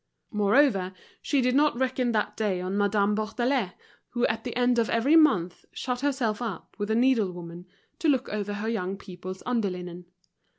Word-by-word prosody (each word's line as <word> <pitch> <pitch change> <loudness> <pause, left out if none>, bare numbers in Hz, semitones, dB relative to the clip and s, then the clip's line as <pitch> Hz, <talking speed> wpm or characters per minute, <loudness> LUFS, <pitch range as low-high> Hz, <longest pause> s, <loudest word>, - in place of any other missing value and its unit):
Moreover, 205 -2 +3 0.3
she 280 -3 +1
did 250 0 +2
not 290 -1 +3
reckon 255 -1 0
that 215 -2 -1
day 205 -4 0
on 185 +2 -3
Madame 205 0 +2
Bourdelais, 220 0 0 0.4
who 240 0 0
at 225 0 -1
the 245 - -5
end 245 0 +3
of 230 - +1
every 260 +7 +3
month 200 - +3
shut 250 -1 -3
herself 255 -6 0
up 220 -8 -5
with 205 +1 -2
a 220 - +2
needlewoman 180 -8 0 0.3
to 330 -4 +2
look 265 -3 +2
over 205 -1 -3
her 205 +2 -4
young 195 -4 -2
people's 185 -1 -9
under 235 -5 0
linen. 180 -1 -7
220 Hz, 175 wpm, -27 LUFS, 190-250 Hz, 0.4 s, Moreover